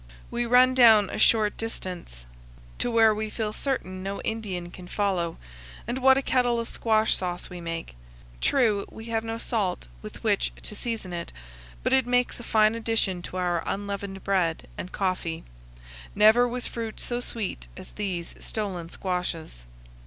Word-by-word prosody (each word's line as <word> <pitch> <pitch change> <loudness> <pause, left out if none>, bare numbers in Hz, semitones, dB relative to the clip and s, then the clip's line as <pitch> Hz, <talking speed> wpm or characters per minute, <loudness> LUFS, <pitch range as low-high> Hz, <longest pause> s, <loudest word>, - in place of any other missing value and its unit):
We 240 0 -1
run 250 +2 +6
down 225 -5 +7
a - - -4
short 215 -2 +4
distance 180 - -6 0.5
to - - +1
where 225 -2 +5
we 215 +1 -3
feel 215 -1 -3
certain 185 -9 -2
no 195 +1 -4
Indian 190 -6 -3
can 180 0 -10
follow, 180 -4 0 0.5
and 240 +3 -2
what 265 0 +6
a 270 - 0
kettle 245 -3 +2
of 230 - -3
squash 220 -1 +2
sauce 180 0 -3
we 180 -1 -7
make! 165 - -5 0.5
True, 220 -7 +3
we 225 - -10
have 225 0 +1
no 225 0 -3
salt 210 -6 -1 0.2
with - - -10
which - - +1
to - - -4
season 225 -6 -4
it, 170 -1 -4 0.5
but - - +2
it 265 -2 +4
makes 245 0 +1
a - - -8
fine 215 -1 +4
addition 225 -5 0
to 180 - -6
our 175 -2 +1
unleavened 200 -1 -4
bread 180 -5 +1
and 180 - -6
coffee. 185 -4 -2 0.7
Never 220 +4 +6
was 245 0 -3
fruit 225 -2 -5
so 240 0 -2
sweet 205 - -4
as - - -7
these 185 -5 -3
stolen 190 -6 -3
squashes. 170 - -4
210 Hz, 165 wpm, -27 LUFS, 180-230 Hz, 0.7 s, down